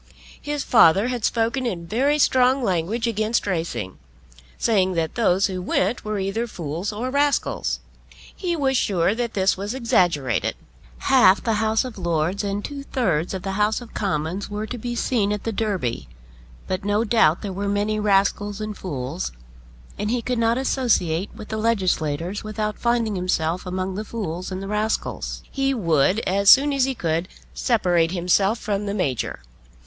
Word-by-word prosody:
His 290 -1 -3
father 210 0 +5
had 245 -3 -3
spoken 235 +3 0
in 175 -7 -4
very 265 - +1
strong 260 -2 +3
language 195 +4 0
against 220 0 0
racing, 160 - -3 0.6
saying 190 -5 +2
that 165 -2 -1
those 195 -4 +2
who 185 -2 -3
went 190 +5 0
were 215 0 -2
either 195 +5 -2
fools 170 0 -4
or 235 +5 -3
rascals. 285 +1 0 0.6
He 350 -3 -2
was 270 -4 +1
sure 190 -5 +2
that 235 0 -3
this 190 -1 +2
was 205 +5 -4
exaggerated. 175 - +1 0.5
Half 205 -8 +5
the 225 - +1
House 220 +2 +2
of 245 -5 -7
Lords 170 +3 0
and 200 0 -2
two 285 -1 -6
thirds 190 - -1
of 185 - -6
the 195 - -2
House 210 +2 +1
of 240 -2 -12
Commons 185 0 -2
were 210 +1 -3
to 245 +2 -6
be 240 +2 -4
seen 225 -4 +1
at 210 -1 -3
the 225 - -2
Derby; 185 - -2 0.6
but 185 0 -2
no 205 +2 +1
doubt 205 -8 +3
there 200 -2 -4
were 200 +2 -2
many 205 +1 0
rascals 205 0 +1
and 215 -1 -4
fools, 130 - -4 0.7
and 210 +1 -1
he 240 0 0
could 250 -2 -1
not 230 +1 +2
associate 210 -10 +1
with 215 -2 -10
the 220 - -3
legislators 185 -5 0
without 215 0 -3
finding 235 -3 +1
himself 180 -1 -1
among 185 +1 -2
the 210 +3 -4
fools 185 -5 -5
and 190 +1 -4
rascals. 210 +2 -2
He 270 0 0
would, 170 - +2
as 200 +2 +2
soon 285 +2 +7
as 270 -2 +3
he 265 -1 -2
could, 165 -2 -1 0.3
separate 175 -8 +2
himself 190 +4 +2
from 205 -2 -2
the 200 - -2
Major. 135 - -2
205 Hz, 170 wpm, -23 LUFS, 180-230 Hz, 0.7 s, soon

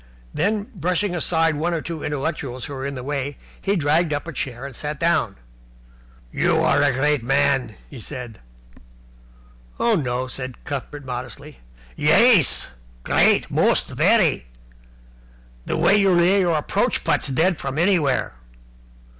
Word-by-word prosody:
Then, 205 +5 0
brushing 180 +3 -1
aside 165 -1 +1
one 170 +3 -1
or 160 - -2
two 165 -2 -6
intellectuals 140 -4 -4
who 145 - -7
were 135 0 -4
in 140 - -5
the 125 - -6
way, 140 0 -3 0.2
he 200 +1 0
dragged 155 0 +1
up 145 +3 -4
a 170 - -6
chair 130 -1 -5
and 140 -3 -8
sat 150 +2 -4
down. 155 -12 +1 1.0
"You - - +1
are - - +2
a - - +3
great 145 +2 +1
man!" 135 -2 +1
he 135 - -11
said. 125 -3 -8 1.4
"Oh, 235 - +2
no," 130 - -1
said 130 0 -7
Cuthbert 140 +1 -6
modestly. 125 - -7 0.4
"Yais! 175 - +4 0.3
Great. - - +2
Most! - - +2
Very! 60 - +2 1.2
The - - -1
way 205 - +4
you 195 -1 +3
lay 180 +3 +4
your 175 -4 +2
approach 150 - -1
putts - - +1
dead 160 +6 +1
from 135 +1 -5
anywhere!" 165 - +1
145 Hz, 145 wpm, -22 LUFS, 130-170 Hz, 1.4 s, Yais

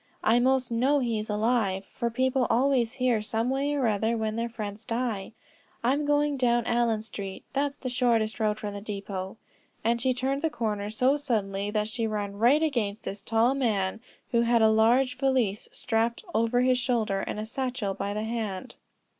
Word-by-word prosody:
I 230 +2 +4
most 255 0 +2
know 260 +5 +3
he 235 -5 0
is 215 - -6
alive, 210 -3 +1
for 235 -2 -2
people 260 +1 +1
always 250 -1 +2
hear, 250 -4 +1
some 225 +3 -1
way 280 +2 0
or 275 -3 +1
other, 220 +1 +1
when 220 -1 -2
their 230 +1 -2
friends 215 -2 -6
die. 230 -3 -3 0.5
I'm 275 +5 +2
going 290 -1 +2
down 240 -2 +2
Allen 235 -3 +1
Street; 195 -3 -7
that's 280 0 -1
the 260 - -6
shortest 240 -3 +1
road 215 -1 +1
from 210 -2 -5
the 200 - -6
depot;" 200 -1 -5 0.5
and 235 +1 +1
she 260 - +2
turned 265 +2 -1
the 320 - +1
corner 210 -6 -2
so 255 +6 +2
suddenly 205 -8 -1
that 210 0 0
she 225 0 -2
ran 205 -2 -3
right 265 +8 +5
against 230 -9 -1
this 200 +1 -5
tall 225 +5 +2
man 220 -7 0 0.3
who 235 -2 +3
had 235 -1 +3
a 220 - +6
large 250 +4 +3
valise 255 -7 +1
strapped 230 0 -1
over 230 +2 +2
his 255 0 +3
shoulder, 230 -5 0
and 210 - -4
a 215 - -3
satchel 245 -4 -2
by 200 +1 -3
the 210 +1 -2
hand. 220 -5 -4
230 Hz, 190 wpm, -27 LUFS, 215-255 Hz, 0.5 s, a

